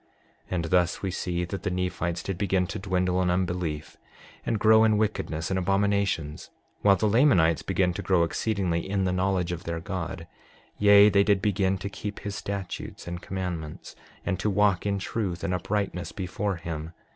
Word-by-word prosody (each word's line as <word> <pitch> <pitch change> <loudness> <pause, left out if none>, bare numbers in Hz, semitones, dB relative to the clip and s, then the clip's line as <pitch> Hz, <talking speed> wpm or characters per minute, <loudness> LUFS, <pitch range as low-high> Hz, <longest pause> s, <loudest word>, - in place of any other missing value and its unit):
6:34 - - -37 0.5
And 85 -2 -1
thus 90 +1 +2
we 95 - -1
see 90 -1 -2
that 95 +1 -5
the 95 - -1
Nephites 90 -1 -2
did 95 - -3
begin 95 -1 +1
to - - -5
dwindle 90 -1 0
in 90 - +1
unbelief, 90 -4 -2 0.5
and 115 - 0
grow 110 +1 +6
in 110 -1 +4
wickedness 100 -6 -1
and 95 - +1
abominations, 100 -5 0 0.3
while 100 -1 +6
the 110 - +1
Lamanites 100 - +4
began 90 -1 +1
to - - -4
grow 90 -3 +3
exceedingly 90 -1 0
in 100 -1 0
the 90 - +1
knowledge 90 -1 0
of 85 +1 -5
their 85 0 -3
God; 85 0 -5 0.5
yea, 105 0 +8
they 100 0 +4
did 100 -1 +3
begin 95 -1 +1
to 95 +2 -5
keep 105 +1 -6
his 100 - -4
statutes 100 -3 -5
and 85 0 -5
commandments, 90 -5 -5 0.3
and 95 -2 -1
to 105 - 0
walk 100 -2 +2
in 100 -1 +1
truth 95 -3 -3
and 90 - -1
uprightness 95 0 -2
before 95 +1 -3
him. 80 -1 -6
95 Hz, 180 wpm, -27 LUFS, 90-100 Hz, 0.5 s, yea